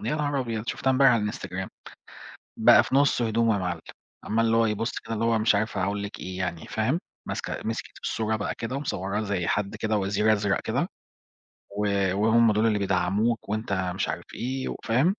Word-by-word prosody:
نهار 145 Hz, -2 st, 0 dB
أبيض! 115 Hz, -2 st, -3 dB
شُفتها 130 Hz, -, -1 dB
امبارح 135 Hz, 0 st, +6 dB
على 105 Hz, -3 st, +1 dB
الInstagram. 95 Hz, -1 st, -5 dB, 0.9 s
بقى -, -, +7 dB
في -, -, -3 dB
نُصّ 140 Hz, -3 st, +4 dB
هدومه 115 Hz, 0 st, +2 dB
يا -, -, 0 dB
معلّم، 90 Hz, -3 st, -2 dB, 0.4 s
عمّال 115 Hz, +2 st, +1 dB
اللي 115 Hz, 0 st, +3 dB
هو 115 Hz, 0 st, +4 dB
يبُصّ 110 Hz, +2 st, -2 dB
كده 115 Hz, -, -5 dB
اللي 115 Hz, +1 st, -1 dB
هو 115 Hz, -1 st, +3 dB
مش 110 Hz, -1 st, +3 dB
عارف 110 Hz, +1 st, 0 dB
أقول 100 Hz, +2 st, -1 dB
لِك 100 Hz, -, -6 dB
إيه 95 Hz, 0 st, -6 dB
يعني، 85 Hz, -3 st, -3 dB
فاهم؟ 120 Hz, +9 st, 0 dB, 0.3 s
ماسكة -, -, -3 dB
مسكِت 115 Hz, 0 st, -4 dB
في -, -, -2 dB
الصورة 110 Hz, 0 st, 0 dB
بقى 105 Hz, -, -3 dB
كده 125 Hz, +4 st, -3 dB
ومصوّراه 100 Hz, -7 st, -2 dB
زي 100 Hz, -5 st, -1 dB
حد 105 Hz, -1 st, -1 dB
كده 110 Hz, -1 st, 0 dB
وزير 105 Hz, +2 st, +2 dB
أزرق 100 Hz, -1 st, +1 dB
كده، -, -, -1 dB, 0.9 s
و 105 Hz, 0 st, 0 dB, 0.3 s
وهُم 110 Hz, +2 st, +4 dB
دُول 110 Hz, +2 st, +2 dB
اللي 105 Hz, -2 st, +2 dB
بيدعّموك، 100 Hz, +4 st, 0 dB
وأنت 110 Hz, -1 st, -2 dB, 0.2 s
مش -, -, -1 dB
عارف -, -, -4 dB
إيه، 130 Hz, +2 st, -3 dB
وفاهم؟ 120 Hz, +6 st, 0 dB
110 Hz, 195 wpm, -26 LUFS, 100-115 Hz, 0.9 s, بقى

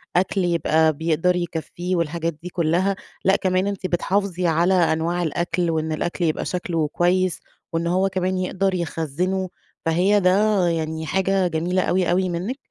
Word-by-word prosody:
أكل 190 Hz, +1 st, +1 dB
يبقى 160 Hz, -2 st, +2 dB
بيقدر 165 Hz, +3 st, +1 dB
يكفيه 175 Hz, +1 st, -3 dB
والحاجات 170 Hz, 0 st, -1 dB
دي 180 Hz, -, -5 dB
كلّها، 180 Hz, +3 st, +1 dB, 0.3 s
لأ 195 Hz, +1 st, +5 dB
كمان 185 Hz, +1 st, +1 dB
أنتِ 195 Hz, -2 st, -3 dB
بتحافظي 180 Hz, 0 st, 0 dB
على 170 Hz, +3 st, +3 dB
أنواع 170 Hz, 0 st, +1 dB
الأكل 170 Hz, +2 st, -1 dB
وإن 160 Hz, 0 st, -1 dB
الأكل 175 Hz, +3 st, -2 dB
يبقى 155 Hz, -, -1 dB
شكله 170 Hz, -4 st, -1 dB
كويس 180 Hz, +2 st, +1 dB, 0.3 s
وإن 165 Hz, +1 st, 0 dB
هو 190 Hz, +2 st, +2 dB
كمان 185 Hz, 0 st, -1 dB
يقدر 190 Hz, +1 st, 0 dB
يخزنه، 175 Hz, +2 st, -2 dB, 0.4 s
فهي 185 Hz, +6 st, +3 dB
ده 195 Hz, 0 st, +3 dB
يعني 160 Hz, -1 st, -2 dB
حاجة 190 Hz, +1 st, +1 dB
جميلة 175 Hz, +3 st, 0 dB
أوي، 180 Hz, -1 st, +1 dB
أوي 185 Hz, 0 st, +1 dB
منِك، 185 Hz, +10 st, -3 dB
175 Hz, 150 wpm, -22 LUFS, 165-185 Hz, 0.4 s, لأ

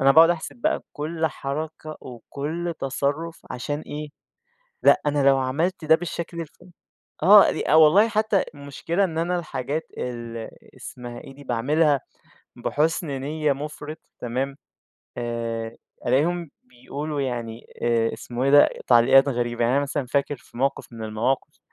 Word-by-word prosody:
أنا 135 Hz, 0 st, +6 dB
باقعد 165 Hz, +3 st, +8 dB
أحسب 170 Hz, +7 st, -3 dB
بقى 240 Hz, -, 0 dB
كل 160 Hz, +2 st, -2 dB
حركة، 155 Hz, +2 st, -5 dB
وكل 150 Hz, +7 st, -5 dB
تصرُّف 145 Hz, +5 st, -2 dB
عشان 145 Hz, +4 st, -3 dB
إيه، 150 Hz, 0 st, -6 dB, 0.8 s
لأ -, -, +6 dB
أنا 145 Hz, -1 st, +1 dB
لو 135 Hz, -1 st, +6 dB
عملت 155 Hz, +7 st, -1 dB
ده 160 Hz, +1 st, +7 dB
بالشكل 170 Hz, 0 st, -5 dB
الف 155 Hz, -, -8 dB, 0.7 s
آه. 200 Hz, +3 st, +9 dB, 0.2 s
أ -, -, +3 dB
والله 160 Hz, +8 st, +7 dB
حتّى 215 Hz, -2 st, +2 dB
المشكلة 145 Hz, +6 st, -2 dB
إن 165 Hz, -3 st, -2 dB
أنا 175 Hz, +2 st, 0 dB
الحاجات 155 Hz, -1 st, -3 dB, 0.2 s
ال 115 Hz, -2 st, -5 dB, 0.3 s
اسمها 120 Hz, -1 st, -8 dB
إيه 135 Hz, -, -12 dB
دي؟ 145 Hz, 0 st, -13 dB
باعملها 140 Hz, +5 st, +2 dB, 0.6 s
بحُسْن 155 Hz, +2 st, 0 dB
نِيّة 150 Hz, +1 st, 0 dB
مُفرِط 150 Hz, +2 st, -6 dB, 0.2 s
تمام، 130 Hz, +3 st, -3 dB, 0.6 s
آآ 115 Hz, -1 st, -3 dB, 0.3 s
ألاقيهم 160 Hz, +6 st, +1 dB
بيقولوا 140 Hz, +4 st, -5 dB
يعني 120 Hz, -3 st, -4 dB, 0.2 s
آآ 115 Hz, -1 st, +2 dB
اسمه 120 Hz, +2 st, -4 dB
ايه 140 Hz, -, +3 dB
ده؟ 145 Hz, 0 st, +8 dB, 0.2 s
تعليقات 130 Hz, +3 st, +6 dB
غريبة. 120 Hz, -2 st, -1 dB
يعني 120 Hz, +3 st, +2 dB
أنا 140 Hz, -, +3 dB
مثلًا 140 Hz, -1 st, -2 dB
فاكر 140 Hz, +2 st, 0 dB
في 120 Hz, -, -19 dB
موقف 135 Hz, -1 st, -1 dB
من 115 Hz, -1 st, -6 dB
المواقف 115 Hz, +5 st, -1 dB
140 Hz, 145 wpm, -24 LUFS, 125-160 Hz, 0.8 s, آه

